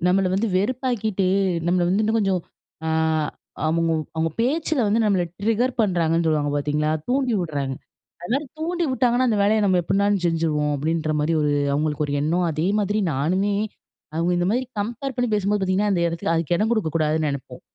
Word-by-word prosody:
நம்மள 190 +1 +3
வந்து 215 +4 +1
வெறுப்பாக்கிட்டு, 220 -2 0 0.4
நம்மள 175 +1 +2
வந்து 200 +4 +2
இன்னும் 220 +1 +1
கொஞ்சம், 195 -4 +1 0.5
ஆ - - 0 0.8
அவுங்க 165 +1 +1 0.2
அவுங்க 160 0 0
பேச்சில 295 +3 0
வந்து 210 +3 +2
நம்மள 195 -4 +2 0.2
ட்ரிக்கர் 225 +4 +1
பண்ணுறாங்கன்னு 170 -5 +1
சொல்லுவாங்க 150 -2 +1
பார்த்தீங்களா! 150 +1 0 0.2
தூண்டி 260 -1 +1
விட்றாங்க. 140 -5 -2 0.5
அதுமாரி 270 +11 -1
தூண்டி 345 +2 -1
விட்டாங்கன்னா 255 0 +2
அந்த 215 -2 +1
வேலைய 215 +2 +3
நம்ம 185 -2 +3
எப்புட்னாலும் 200 +2 +1
செஞ்சுருவோம், 155 -3 0
அப்பிடின்றமாரி 155 +1 0
ஒரு 150 - +1 0.2
அவுங்களுக்கு 150 +1 0
ஒரு 140 - -4
எண்ணம், 170 +4 +1
அதே 155 +2 -1
மாதிரி 205 +1 0
நானுமே 185 +9 0 0.6
அவுங்க 165 +2 0
இந்தமாரி 200 +9 +1 0.2
கம்பேர் 240 +6 -4
பண்ணி 245 -1 0
பேசும்போது 205 0 +1
பார்த்தீங்கன்னா, 190 +2 +1
அந்த 175 - +1
இடத்துல 165 0 -2
அதுக்கு 165 +1 0
இடம் 215 +4 0
குடுக்கக்கூடாதுன்னு 160 -6 0
நினைப்போம் 130 -2 -7
185 Hz, 160 wpm, -23 LUFS, 160-220 Hz, 0.8 s, நம்மள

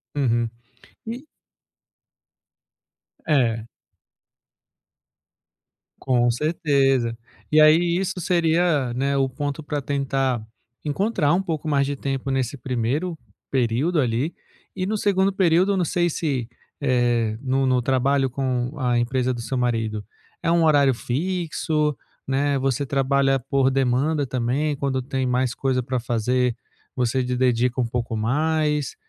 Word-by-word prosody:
Uhum. 120 -4 +1 0.6
E 245 +6 -6 2.0
É. 115 -7 +2 2.3
Com 120 -2 +2
certeza. 135 -5 +1 0.3
E 155 - +5
aí 170 +3 +5
isso 190 0 -2
seria, 165 -6 +1
né, 140 +2 0
o 135 -1 +2
ponto 145 +3 -4
pra 145 -1 -3
tentar 135 -3 -1 0.4
encontrar 155 0 +1
um 185 - +2
pouco 160 -3 -3
mais 140 -2 +2
de 140 +1 -2
tempo 135 0 -3
nesse 130 +1 -1
primeiro 130 +7 -2 0.3
período, 135 +6 +1
ali. 125 +5 0 0.4
E 185 - -2
no 215 +3 -1
segundo 195 -2 +2
período. 190 +1 +3
Não 180 - +1
sei 175 +2 +1
se, 140 -7 -2 0.3
eh, 120 -4 +1
no 135 0 +1
no 130 -1 +2
trabalho 135 +2 +1
com 130 -1 -2
a 125 -2 +1
empresa 125 +1 0
do 120 - -5
seu 130 +3 -3
marido, 115 -4 -1 0.4
é 165 - +1
um 170 0 +3
horário 145 -4 +4
fixo, 155 +2 -1 0.3
né, 140 +1 +1
você 135 +1 0
trabalha 135 0 +2
por 135 +1 +1
demanda 135 +3 +1
também? 130 +4 -1
Quando 135 -1 -1
tem 130 +1 -2
mais 125 0 +1
coisa 130 -1 0
pra 130 -1 -2
fazer, 120 +1 0 0.4
você 125 +1 0
de 125 0 -2
dedica 125 0 +1
um - - +1
pouco 115 -1 -3
mais? 150 +5 0
135 Hz, 130 wpm, -23 LUFS, 125-155 Hz, 2.3 s, E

